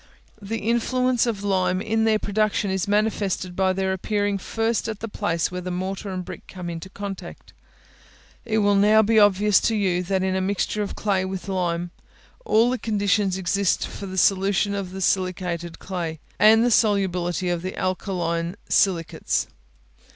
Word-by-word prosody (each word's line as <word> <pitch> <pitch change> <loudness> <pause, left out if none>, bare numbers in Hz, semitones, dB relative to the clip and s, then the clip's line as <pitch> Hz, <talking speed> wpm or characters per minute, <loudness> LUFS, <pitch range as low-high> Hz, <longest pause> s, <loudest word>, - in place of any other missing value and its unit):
The 215 +3 -3
influence 240 +3 +1
of 210 -4 -2
lime 185 -2 +1
in 220 +2 0
their 220 -1 +3
production 210 -1 0
is 190 -1 -1
manifested 205 -3 0
by 190 0 +2
their 190 0 -1
appearing 205 +1 -1
first 225 +4 -1
at 220 -2 -4
the 225 - -5
place 175 -6 -1
where 180 0 -4
the 180 - -5
mortar 190 +3 -4
and 185 -1 -4
brick 185 -1 -9
come 180 -2 -6
into 165 +2 -7
contact. 200 0 -8 0.9
It 220 -2 -1
will 205 - +4
now 210 +2 +5
be 220 +1 +4
obvious 205 0 +5
to 225 - 0
you, 185 -4 +1
that 190 +1 -1
in 190 0 0
a 190 - 0
mixture 200 +2 -1
of 205 - -4
clay 195 -3 0
with 190 -1 -5
lime, 175 -2 -1 0.5
all 230 +3 +4
the 255 - -2
conditions 205 -3 +1
exist 190 +1 +1
for 200 - -8
the 190 0 -6
solution 195 +2 +2
of 200 -2 -3
the 190 +1 -7
silicated 180 -2 -1
clay, 170 -4 -5 0.2
and 225 +2 +6
the 245 - +2
solubility 185 -5 +1
of 175 -1 -1
the 185 +1 -5
alkaline 175 -2 -2
silicates. 175 -5 +1
195 Hz, 170 wpm, -23 LUFS, 185-210 Hz, 0.9 s, and